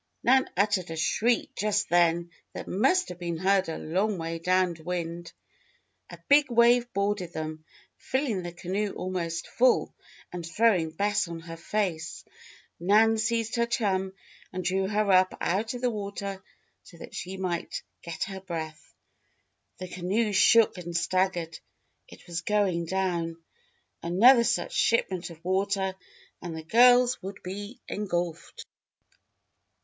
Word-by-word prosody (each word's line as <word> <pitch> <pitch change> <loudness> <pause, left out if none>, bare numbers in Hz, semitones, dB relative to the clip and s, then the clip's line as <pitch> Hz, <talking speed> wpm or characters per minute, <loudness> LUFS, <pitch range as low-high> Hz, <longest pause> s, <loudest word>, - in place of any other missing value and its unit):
Nan 260 +2 +4
uttered 200 -3 +1
a 165 - -4
shriek 225 +9 +1
just 205 0 0
then 170 0 +2 0.2
that - - -7
must 365 - +2
have 180 -1 -8
been 170 -2 -3
heard 190 +1 +2
a 160 - -4
long 195 +5 -1
way 165 0 -4
down 180 0 +2
wind. 170 0 -4 0.8
A - - -10
big 285 0 +5
wave 240 +1 +4
boarded 200 -2 -1
them, 155 0 -5 0.3
filling 260 -8 -1
the 175 -1 -6
canoe 190 +4 -3
almost 170 -2 -3
full, 250 0 +2 0.4
and 175 -1 -5
throwing 180 -1 +2
Bess 200 +4 0
on 165 -1 -7
her 165 0 -8
face. 170 -2 -3 0.5
Nan 215 +5 +4
seized 225 +1 -1
her 235 0 +2
chum 195 -6 0 0.4
and 185 0 -4
drew 190 +1 0
her 210 0 +1
up 185 0 +4
out 215 +7 -1
of 245 - -6
the 250 -1 +1
water 200 -2 -5 0.4
so 170 - -16
that - - -11
she 185 +2 -6
might 180 -2 -3 0.2
get 170 -1 -4
her 190 -1 -6
breath. 160 -4 -7 0.8
The 185 - -6
canoe 195 +5 -1
shook 210 0 +5
and 170 -1 -3
staggered. 175 -3 0 0.5
It - - -15
was 170 -1 -4
going 195 -5 +1
down! 175 -3 -1 0.6
Another 235 +8 +6
such - - 0
shipment 190 -6 +1
of 165 0 -14
water 190 0 0 0.5
and 170 -2 -6
the 160 - -7
girls 245 +6 +5
would 195 +1 -8
be 205 +5 -7
engulfed! 175 -5 -4
190 Hz, 145 wpm, -27 LUFS, 170-210 Hz, 0.8 s, Another